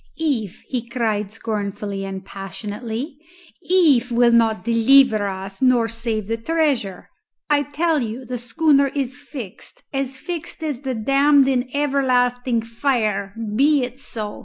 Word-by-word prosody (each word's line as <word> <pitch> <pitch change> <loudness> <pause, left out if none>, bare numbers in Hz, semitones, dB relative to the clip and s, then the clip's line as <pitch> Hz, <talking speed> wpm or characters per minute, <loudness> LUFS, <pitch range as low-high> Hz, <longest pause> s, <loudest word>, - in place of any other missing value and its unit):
"If!" 250 - -2
he 240 -2 -4
cried 215 -4 -1
scornfully 205 -2 -4
and 190 -1 -6
passionately. 220 - -6 0.4
"If 295 -10 +3
will 240 0 +4
not 225 -5 +2
deliver 230 -2 +4
us 195 +2 -6
nor 250 -3 +4
save 230 -2 -3
the 225 +3 -2
treasure. 270 - -1 0.4
I 290 -1 +4
tell 300 +3 0
you 235 +3 -5
the 250 0 -4
schooner 280 +3 +3
is 275 0 -2
fixed 250 -8 -10
as 270 -1 -2
fixed 330 +1 -6
as 295 -6 -2
the 265 -2 -3
damned 275 +4 +4
in 255 -1 0
everlasting 250 -4 +1
fire. 225 -5 -1 0.2
Be 285 +2 +4
it 250 +1 -6
so!" 215 -6 -6
245 Hz, 135 wpm, -21 LUFS, 220-275 Hz, 0.4 s, will